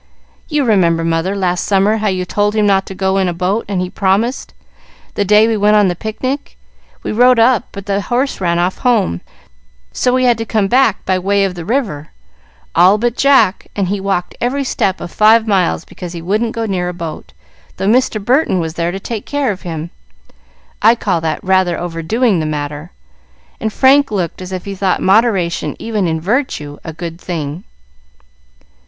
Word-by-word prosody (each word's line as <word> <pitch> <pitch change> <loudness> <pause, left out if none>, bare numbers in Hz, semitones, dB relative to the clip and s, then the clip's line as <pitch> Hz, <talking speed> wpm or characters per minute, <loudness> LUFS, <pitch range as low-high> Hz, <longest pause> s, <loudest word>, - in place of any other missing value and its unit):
You 295 -3 +1
remember, 170 -7 +2
mother, 165 +4 0
last 180 -3 0
summer, 200 +2 +2
how 215 0 -1
you 185 -2 -1
told 205 +3 0
him 215 -1 +2
not 195 -1 +2
to 190 - -7
go 190 0 0
in 190 - +1
a 175 - -2
boat 190 +5 -1
and 195 -3 -1
he 180 - -2
promised, 215 +6 0 0.6
the 205 - 0
day 210 +2 +5
we 225 - +1
went 210 0 +3
on 205 -3 +4
the 175 - -2
picnic. 255 - -4 0.5
We - - -3
rode 245 +3 +4
up, 230 0 +3
but 200 -1 -8
the 200 0 -1
horse 250 +2 -1
ran 170 -2 +1
off 180 +2 -1
home, 215 - +1 0.7
so 250 - +1
we 255 0 +1
had 240 -2 +3
to - - -1
come 215 -2 0
back 245 -2 +2
by 185 -1 +1
way 200 +2 +1
of 190 - -2
the 175 -2 -8
river, 205 - -2 0.6
all 185 +5 +5
but 240 +2 -1
Jack, 270 -9 +3
and 195 -3 -1
he 200 0 -1
walked 190 -2 -2
every 270 +4 0
step 195 -7 -1
of - - -7
five 220 +1 +4
miles 185 - +1
because 175 -1 -9
he 170 - -6
wouldn't 215 +6 -1
go 230 0 -2
near 180 -4 -2
a 180 - -6
boat, 165 -3 -7 0.5
though - - -3
Mr. 235 0 +2
Burton 245 - +1
was 160 -1 -3
there 170 0 -1
to 195 - -5
take 215 +1 -6
care 285 -5 0
of 190 - -7
him. 165 -1 -6 0.9
I 225 +2 +6
call 190 -7 -1
that 160 -1 -3
rather 185 -2 +2
overdoing 175 +5 0
the 155 - -2
matter;" 150 +1 -4 0.7
and 220 - -2
Frank 275 +4 +4
looked 185 -4 -3
as 185 0 -7
if 185 -1 -5
he 200 - -5
thought 190 -1 0
moderation 195 -4 +2
even 215 -5 -2
in 160 -1 -1
virtue 165 - -2
a 165 - -6
good 170 +1 -7
thing. 165 0 -5
195 Hz, 195 wpm, -16 LUFS, 175-225 Hz, 0.9 s, I